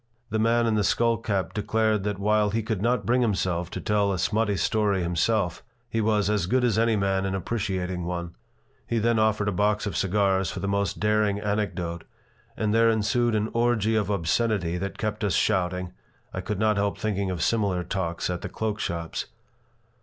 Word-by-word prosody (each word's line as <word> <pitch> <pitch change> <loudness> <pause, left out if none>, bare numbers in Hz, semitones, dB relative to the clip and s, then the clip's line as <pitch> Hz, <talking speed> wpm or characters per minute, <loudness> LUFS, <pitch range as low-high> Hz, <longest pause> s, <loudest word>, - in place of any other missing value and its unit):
The 110 - 0
man 115 +2 +3
in 115 - +1
the 105 -1 +2
skull 115 +3 +2
cap 100 -4 -2
declared 110 -1 +1
that 105 -2 -1
while 105 +1 +2
he 110 +2 -1
could 110 -3 -2
not 120 +3 +1
bring 125 +2 +2
himself 95 -6 0
to - - -5
tell 105 -1 +1
a 95 - -1
smutty 105 +2 +1
story 105 -4 +1
himself, 90 +2 0 0.3
he 115 -1 -1
was 105 -2 +2
"as 105 -4 +1
good 125 +5 +2
as 115 -3 +2
any 115 -1 +3
man 95 -1 +1
in 95 0 -1
appreciating 95 -3 -2
one." 85 -1 -4 0.5
He 115 - 0
then 115 0 +2
offered 110 -1 +2
a - - +2
box 105 +3 +1
of 105 - -3
cigars 95 -1 +1
for - - -5
the 100 - -3
most 100 -1 -1
daring 105 -1 +2
anecdote, 100 -5 -2 0.5
and 105 -1 0
there 115 0 +5
ensued 115 +1 +1
an 105 +1 0
orgy 115 -2 +2
of 105 -2 0
obscenity 100 -1 0
that 100 +2 -4
kept 110 0 -3
us 100 -5 +1
shouting 90 -3 0 0.4
(I - - -3
could 105 - -3
not 105 0 +2
help 100 0 0
thinking 100 -3 -1
of 90 -4 -2
similar 100 -6 +1
talks 85 -1 -2
at 90 - -4
the - - -5
cloak 105 +2 -3
shops). 85 -4 -3
105 Hz, 195 wpm, -26 LUFS, 95-110 Hz, 0.5 s, there